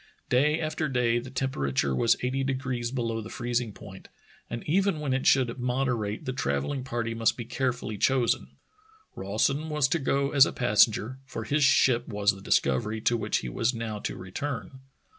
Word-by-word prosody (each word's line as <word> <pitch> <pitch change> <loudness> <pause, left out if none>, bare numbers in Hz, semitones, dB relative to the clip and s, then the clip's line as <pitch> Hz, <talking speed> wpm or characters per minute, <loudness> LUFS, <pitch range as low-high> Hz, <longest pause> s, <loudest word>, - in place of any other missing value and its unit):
Day 150 +5 +3
after 155 -1 -2
day 120 -2 +2
the 125 +2 -8
temperature 70 - -1
was 115 - +3
eighty 130 +2 0
degrees 130 -3 -2
below 115 -3 -2
the 110 - -9
freezing 120 -1 -2
point, 95 -1 -12 0.4
and 120 0 -5
even 190 +1 +2
when 145 -3 -1
it 130 - 0
should 130 -2 +3
moderate 125 -4 -1
the 130 - -2
travelling 100 - -2
party 120 -3 -3
must 115 0 +1
be 120 - -5
care 130 +2 0
fully 110 -4 -6
chosen. 130 -1 +1 0.6
Rawson 135 +10 0
was 150 -3 +2
to 170 - +1
go 140 0 0
as 140 -2 +6
a - - -4
passenger, 110 +2 +2
for 115 - -5
his 145 +6 +1
ship 125 -2 +4
was 105 -2 +2
the 95 - -11
Discovery 105 +9 +1
to 120 - +2
which 115 - 0
he - - -3
was 115 - 0
now 110 -2 -4
to - - -4
re 95 0 -10
turn. 135 +1 -5
125 Hz, 185 wpm, -27 LUFS, 110-135 Hz, 0.6 s, as